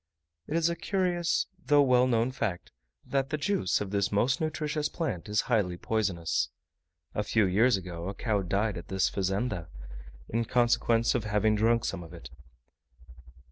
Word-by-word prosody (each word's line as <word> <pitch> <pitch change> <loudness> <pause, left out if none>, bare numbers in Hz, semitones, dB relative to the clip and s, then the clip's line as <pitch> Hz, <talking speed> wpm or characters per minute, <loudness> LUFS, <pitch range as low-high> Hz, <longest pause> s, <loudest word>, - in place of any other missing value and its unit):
It 150 - -3
is 165 0 +3
a 170 - -1
curious, 175 -3 0 0.2
though 145 -1 +5
well 125 -1 +4
known 120 0 +1
fact, 100 -9 -3 0.3
that 135 -1 -1
the 155 - -1
juice 150 - 0
of 100 -2 -4
this 100 -1 0
most 125 +7 +1
nutritious 150 -1 -1
plant 110 - -4
is 105 +1 +2
highly 100 -8 0
poisonous. 95 -6 -1 0.6
A - - -1
few 110 0 +2
years 105 +5 +3
ago 90 -1 -6
a 100 - -6
cow 105 -2 0
died 100 +1 -1
at - - -12
this 95 0 +1
Fazenda, 95 -2 -2 0.6
in 115 +1 -1
consequence 120 -1 +2
of 120 -4 -1
having 105 +1 +2
drunk 115 +2 +2
some - - -3
of 85 0 -10
it. 65 -7 -11
110 Hz, 165 wpm, -29 LUFS, 95-130 Hz, 0.6 s, though